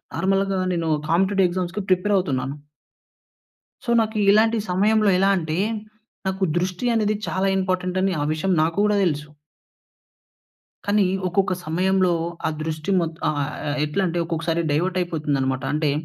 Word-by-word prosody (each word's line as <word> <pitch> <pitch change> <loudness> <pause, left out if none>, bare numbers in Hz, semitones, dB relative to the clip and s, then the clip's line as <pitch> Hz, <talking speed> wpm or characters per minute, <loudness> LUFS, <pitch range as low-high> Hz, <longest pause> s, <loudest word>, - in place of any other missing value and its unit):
నార్మల్‌గా 195 0 +1
నేను 165 -2 -1 0.2
కాంపిటీటివ్ 190 +2 +3
ఎగ్జామ్స్‌కి 185 +3 -3
ప్రిపేరవుతున్నాను. 180 -8 +1 1.3
సో, - - -5
నాకు 220 0 -3 0.2
ఇలాంటి 225 +2 +4
సమయంలో 210 +3 +3
ఎలా 195 +1 +3
అంటే, 160 -1 -2 0.7
నాకు 190 0 -2
దృష్టి 180 +5 -2
అనేది 215 -1 +1
చాలా 190 +1 0
ఇంపార్టెంటని 185 0 0
ఆ - - +1
విషయం 190 +5 -1
నాకు 165 +1 0
గూడా 210 0 +2
తెలుసు. 150 -3 -1 1.6
కానీ 205 -1 +3 0.2
ఒక్కొక్క 190 +1 +1
సమయంలో, 185 +2 +2 0.3
ఆ - - +2
దృష్టి 155 +3 -3
మొత్ 165 -1 -4
ఆహ్, 155 - 0 0.3
ఆహ్, 145 0 -1
ఎట్లం‌టే, 175 +3 -1
ఒక్కొక్కసారి 165 0 -1
డైవర్టయిపోతుందనమాట. 150 -6 -1
అంటే, 150 -1 +1
180 Hz, 125 wpm, -23 LUFS, 160-195 Hz, 1.6 s, ఇలాంటి